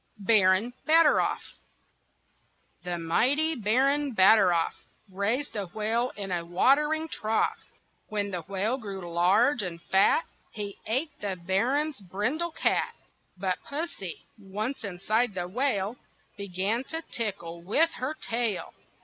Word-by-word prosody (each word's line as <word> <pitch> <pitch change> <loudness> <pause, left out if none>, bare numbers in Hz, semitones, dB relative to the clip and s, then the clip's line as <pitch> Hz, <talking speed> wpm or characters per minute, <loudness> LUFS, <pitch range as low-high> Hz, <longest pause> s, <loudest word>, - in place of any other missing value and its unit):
BARON 205 +2 +3
BATTEROFF 320 0 +3 1.2
The 175 -1 -3
mighty 265 - +2
baron, 270 +3 +1
Batteroff, 190 -4 +5 0.3
Raised 205 +9 -2
a 200 -3 -3
whale 220 +6 -1
in 195 -2 -5
a 175 -1 -1
watering 295 - +2
trough. 220 -7 0 0.5
When 205 -1 -2
the 180 -2 -3
whale 200 +8 -1
grew 195 -5 -6
large 210 +10 +4
and 175 -3 -5
fat 195 - +3 0.3
He 205 -2 -6
ate 265 +8 0
the 200 -2 -2
baron's 235 - 0
brindle 215 - -1
cat. - - 0 0.4
But 185 -1 -1
pussy, 285 - -5
once 215 +7 -4
inside 210 +3 0
the 175 -1 -2
whale, 220 0 -1 0.4
Began 200 +4 -2
to 325 +3 -5
tickle 170 - -5
with 300 - +2
her 265 +5 -3
tail. 230 -8 -2
210 Hz, 120 wpm, -28 LUFS, 190-260 Hz, 1.2 s, Batteroff